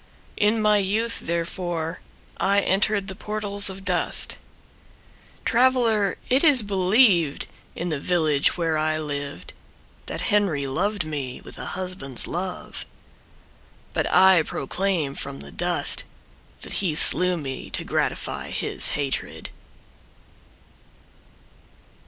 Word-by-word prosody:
In 210 +2 +2
my 210 -1 +3
youth 215 +4 -1
therefore 170 0 -3 0.4
I 200 +1 +2
entered 200 +1 +1
the 190 - -5
portals 205 -1 0
of 190 0 -9
dust. - - +1 1.1
Traveler, 230 -5 +2
it 260 +4 +3
is 285 -8 +6
believed 190 - +3 0.3
in 175 +2 -4
the 150 -3 -2
village 155 -3 +2
where 165 -2 0
I 155 0 0
lived 145 -2 -6 0.5
That - - -4
Henry 180 -9 +1
loved 190 +7 -1
me 140 -5 -5
with - - -11
a - - -5
husband's 180 -9 -4
love 180 +2 -5 1.1
But - - -1
I 185 -1 +6
proclaim 160 0 -2
from 70 - -7
the 70 0 -11
dust - - +4 0.6
That - - -5
he 175 -6 -1
slew 180 +3 +6
me 135 -4 -6
to - - -3
gratify - - -2
his - - -1
hatred. 140 -2 -4
180 Hz, 115 wpm, -24 LUFS, 155-205 Hz, 1.1 s, is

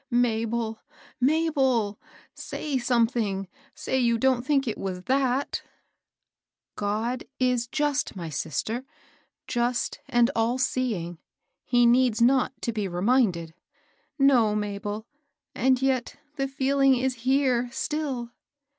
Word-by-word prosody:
"Mabel! 230 -2 0 0.4
Mabel! 265 -7 +2 0.3
say 285 -4 -3
something, 230 -5 +1
— - - -31
say 265 - +1
you 235 -2 +2
don't 260 0 +2
think 275 0 +1
it 225 - -3
was 185 -2 -4
that! 265 +2 0 0.6
" - - -61 0.3
God 220 +5 -2
is 250 -2 +1
just, 295 -1 -1
my 170 -3 -5
sister, 160 - -3 0.3
— - - -41
just 240 +1 0
and 240 +1 +3
all 230 +2 +1
seeing. 215 -11 -1 0.5
He 245 -1 +4
needs 240 -1 +4
not 260 +2 +3
to 235 - -1
be 210 -3 -2
reminded." 180 -3 +1 0.6
No, 250 -7 +4
Mabel; 210 +1 -3 0.5
and 260 0 +2
yet 260 -3 0 0.2
the 275 -1 -1
feeling 270 0 +3
is 255 0 -1
here 255 -2 +2
still." 265 -4 -3
245 Hz, 120 wpm, -26 LUFS, 220-265 Hz, 0.6 s, He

